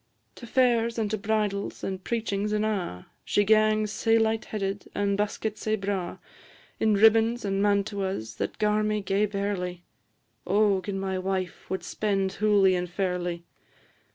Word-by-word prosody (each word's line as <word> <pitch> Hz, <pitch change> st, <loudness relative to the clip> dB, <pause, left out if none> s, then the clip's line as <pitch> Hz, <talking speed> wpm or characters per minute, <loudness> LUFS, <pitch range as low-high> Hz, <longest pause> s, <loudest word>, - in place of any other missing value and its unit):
To 235 Hz, -, -11 dB
fairs, 235 Hz, -2 st, +2 dB
and 215 Hz, -2 st, -1 dB
to 215 Hz, -, 0 dB
bridals, 205 Hz, -1 st, -1 dB
and 190 Hz, -1 st, -4 dB
preachings 210 Hz, -3 st, -1 dB
an' 210 Hz, 0 st, +1 dB
a', 190 Hz, -, -2 dB, 0.2 s
She 205 Hz, -, +2 dB
gangs 215 Hz, 0 st, +3 dB
sae 225 Hz, +1 st, +2 dB
light 225 Hz, 0 st, +1 dB
headed, 200 Hz, -1 st, -4 dB
and 200 Hz, 0 st, +1 dB
buskit 210 Hz, +1 st, -2 dB
sae 215 Hz, 0 st, 0 dB
braw, 195 Hz, -3 st, -3 dB, 0.6 s
In 215 Hz, -1 st, +3 dB
ribbons 225 Hz, +2 st, +4 dB
and 195 Hz, 0 st, 0 dB
mantuas, 200 Hz, -, -1 dB
that -, -, -3 dB
gar 210 Hz, 0 st, +2 dB
me 215 Hz, 0 st, 0 dB
gae 195 Hz, +2 st, +1 dB
barely. 195 Hz, -3 st, -3 dB, 0.6 s
O 200 Hz, 0 st, +3 dB
gin 195 Hz, 0 st, -4 dB
my 190 Hz, -1 st, -2 dB
wife 185 Hz, -1 st, -3 dB
wad 190 Hz, -1 st, -3 dB
spend 195 Hz, 0 st, -1 dB
hooly 205 Hz, -3 st, +4 dB
and 180 Hz, -1 st, -1 dB
fairly! 175 Hz, -2 st, -2 dB
205 Hz, 155 wpm, -27 LUFS, 190-215 Hz, 0.6 s, ribbons